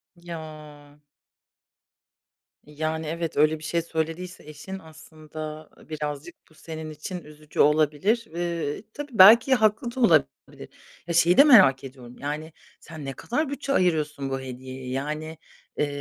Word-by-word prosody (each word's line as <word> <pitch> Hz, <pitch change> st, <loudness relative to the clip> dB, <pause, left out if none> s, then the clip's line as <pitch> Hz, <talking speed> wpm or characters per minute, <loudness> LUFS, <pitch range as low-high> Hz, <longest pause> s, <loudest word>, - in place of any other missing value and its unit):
Ya. 155 Hz, -3 st, -11 dB, 1.6 s
Yani, 155 Hz, +1 st, -4 dB
evet, 165 Hz, -1 st, -4 dB
öyle 155 Hz, +1 st, +3 dB
bir -, -, -14 dB
şey 170 Hz, +1 st, -1 dB
söylediyse 165 Hz, +2 st, -4 dB
eşin 190 Hz, +6 st, -8 dB
aslında, 155 Hz, -1 st, -10 dB
ııı, -, -, -19 dB
birazcık 150 Hz, +2 st, -5 dB
bu 160 Hz, -, -23 dB
senin 160 Hz, 0 st, -8 dB
için 155 Hz, +4 st, -7 dB
üzücü 150 Hz, 0 st, -11 dB
olabilir. 155 Hz, +10 st, +3 dB
Iıı, 170 Hz, -1 st, -3 dB
tabii 290 Hz, -1 st, -7 dB
belki 225 Hz, +7 st, +8 dB
haklı 220 Hz, +2 st, +1 dB
da -, -, -5 dB
olabilir. 165 Hz, -, +1 dB, 0.4 s
Ya, 170 Hz, -, -2 dB
şeyi 170 Hz, +1 st, +4 dB
de 280 Hz, -, +10 dB
merak 190 Hz, -, +6 dB
ediyorum: 125 Hz, -2 st, -11 dB
Yani, 150 Hz, +2 st, -5 dB, 0.3 s
sen 155 Hz, -3 st, -10 dB
ne 135 Hz, -, -4 dB
kadar 290 Hz, -, -2 dB
bütçe 280 Hz, 0 st, -3 dB
ayırıyorsun 150 Hz, -, 0 dB
bu 135 Hz, 0 st, -2 dB
hediyeye? 130 Hz, 0 st, -8 dB
Yani, 150 Hz, +4 st, -4 dB, 0.4 s
ııı, 150 Hz, -, +2 dB
155 Hz, 140 wpm, -25 LUFS, 150-175 Hz, 1.6 s, de